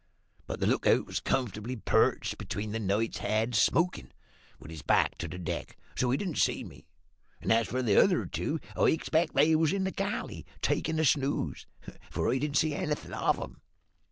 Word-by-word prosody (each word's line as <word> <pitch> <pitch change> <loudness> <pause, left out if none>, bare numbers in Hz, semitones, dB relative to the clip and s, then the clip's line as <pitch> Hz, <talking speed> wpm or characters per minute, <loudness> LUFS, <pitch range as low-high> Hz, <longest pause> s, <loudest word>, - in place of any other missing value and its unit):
But - - -4
the - - 0
lookout - - +3
was - - -3
comfortably 120 -1 -2
perched 110 - +1
between 105 +1 -4
the 115 - -2
knight 105 +2 -1
heads, 110 +1 +1
smokin', 175 +2 +1 0.5
with 80 - -11
his 80 -2 -8
back - - +2
to 85 - -3
the 85 - -7
deck, 90 - -5 0.2
so 125 - +1
he 130 - +2
didn't 180 -4 -3
see - - +1
me; - - -13 0.5
and, - - -2
as 115 0 +2
for 130 +1 -2
the 105 -4 +5
other 185 -3 +2
two, 160 - -2 0.2
I - - +3
expects 160 +1 +1
they 155 +3 +5
was 155 -1 +3
in 195 -1 0
the 190 - -1
galley, 200 +4 -3 0.2
takin' 160 0 0
a 160 - +2
snooze, 135 - 0 0.4
for 115 - 0
I 130 - +1
didn't 150 +1 0
see 155 -1 +2
anything 150 +1 -3
of - - +1
'em. - - -8
130 Hz, 190 wpm, -29 LUFS, 110-160 Hz, 0.5 s, the